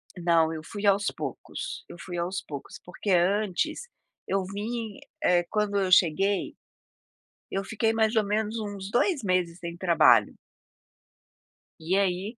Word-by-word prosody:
Não, 170 -2 +2
eu 155 - -5
fui 205 +4 -6
aos 200 +1 +3
poucos, - - -5
eu - - -10
fui 175 -2 -6
aos 180 +3 -2
poucos. 140 -2 -9
Porque 190 +3 -4
antes 190 - +1 0.4
eu 195 0 0
vim 215 +2 -5 0.2
eh, 175 -1 +4
quando 210 -1 0
eu 190 -2 0
cheguei, 190 +3 +3 1.0
eu 195 - -1
fiquei 225 +2 0
mais 220 0 +2
ou 215 - +4
menos 215 +2 -1
uns 205 -2 -5
2 280 - +1
meses 180 -3 0
sem 170 -2 -6
trabalho. 155 - +4 1.5
E 165 +4 0
aí 195 +4 -1
195 Hz, 140 wpm, -27 LUFS, 175-210 Hz, 1.5 s, eh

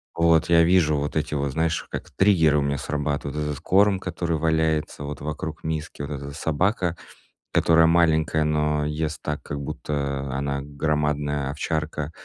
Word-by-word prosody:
Вот, 85 -1 +3
я 85 -1 +6
вижу 85 -3 +4
вот 75 +1 -3
эти 75 -1 -1
вот, 70 -1 -1
знаешь, 80 +3 0
как - - -6
триггеры 80 -7 +4
у 75 - +2
меня 70 0 0
срабатывают. 75 0 -3
Этот 75 -1 -3
корм, 100 +2 +3
который 85 -3 -2
валяется 80 -2 0
вот 70 -1 -6
вокруг 75 +2 -5
миски, 80 -2 -4
вот 70 +1 -5
эта 70 0 -5
собака, 85 +3 0 0.5
которая 80 0 +4
маленькая, 80 -2 +3
но 75 -1 +1
ест 75 +1 -3
так, 75 -1 -4
как 70 - -5
будто 70 -1 -3
она 70 0 -2
громадная 75 -1 -1
овчарка, 75 0 -3
75 Hz, 155 wpm, -24 LUFS, 75-80 Hz, 0.5 s, я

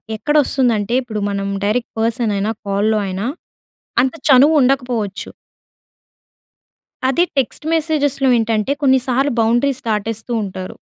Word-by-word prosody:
ఎక్కడ 295 +8 -2
వస్తుందంటే 235 -6 0
ఇప్పుడు 220 -4 -5
మనం 200 0 -3 0.2
డైరెక్ట్ 235 +4 -1
పర్సన్ 230 -1 0
అయినా, 205 +3 -1 0.2
కాల్‌లో 210 +2 +1
అయినా 190 +3 -3 0.8
అంత 265 +4 -1
చనువు 280 +4 +6
ఉండకపోవచ్చు. 245 -6 -1 1.8
అది 340 +6 +2
టెక్స్ట్ 270 +3 -1
మెసేజెస్‌లో 290 -4 0
ఏంటంటే 225 +2 0
కొన్నిసార్లు 265 0 +2
బౌండరీస్ 240 +4 +1
దాటేస్తూ 220 +2 -3
ఉంటారు. 185 -1 -7
235 Hz, 110 wpm, -18 LUFS, 210-270 Hz, 1.8 s, చనువు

